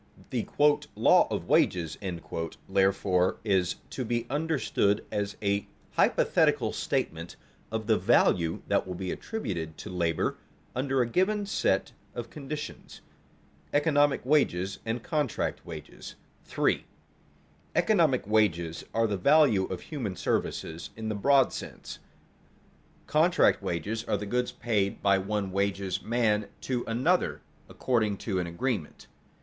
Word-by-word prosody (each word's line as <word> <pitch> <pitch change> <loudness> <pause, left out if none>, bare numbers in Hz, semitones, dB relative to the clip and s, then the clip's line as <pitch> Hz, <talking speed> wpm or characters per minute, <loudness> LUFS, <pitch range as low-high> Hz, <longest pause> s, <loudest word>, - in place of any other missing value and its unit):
The - - -2 0.5
"law - - +5
of - - -3
wages," 85 -4 +2 0.7
therefore, 95 -1 +2
is 95 -5 +1 0.2
to 130 - -3
be 120 0 -1
understood 145 -9 +1
as 100 0 -2
a 100 0 0 0.2
hypothetical - - +2
statement 80 +1 -2 0.4
of 110 -1 -2
the 110 -1 +3
value 90 -5 +3
that - - +1
will 90 - -4
be 90 0 -4
attributed 85 - -4
to 105 - -8
labor 85 -2 0 0.4
under 135 +1 +1
a - - -3
given 200 - +1
set 200 - 0 0.2
of 120 -2 -6
conditions. 150 0 -7 0.6
[Sidenote: - - -32
Economic 145 -3 +3
wages 100 -10 +1
and 115 +1 -2
contract 150 -7 -1
wages] - - -9 0.3
3. - - +1 0.9
_Economic 165 - +3
wages 85 -6 +1
are 115 0 +3
the 105 -3 -1
value 135 - +4
of 95 - -5
human 120 -11 -4
services 80 -1 -2
in 110 0 -4
the - - -1
broad 135 +5 +3
sense; - - -8 1.1
contract - - +3
wages 105 +7 -3
are - - 0
the 105 - -5
goods 125 +4 -1
paid 105 -4 -1
by 100 -1 +4
one 100 0 -2
wages 100 -1 -1
man 110 -3 +1
to 125 -2 -2
another 130 +11 +1 0.3
according 110 -5 0
to 95 -3 -2
an 90 - -2
agreement. 90 - -3
105 Hz, 130 wpm, -28 LUFS, 95-130 Hz, 1.1 s, law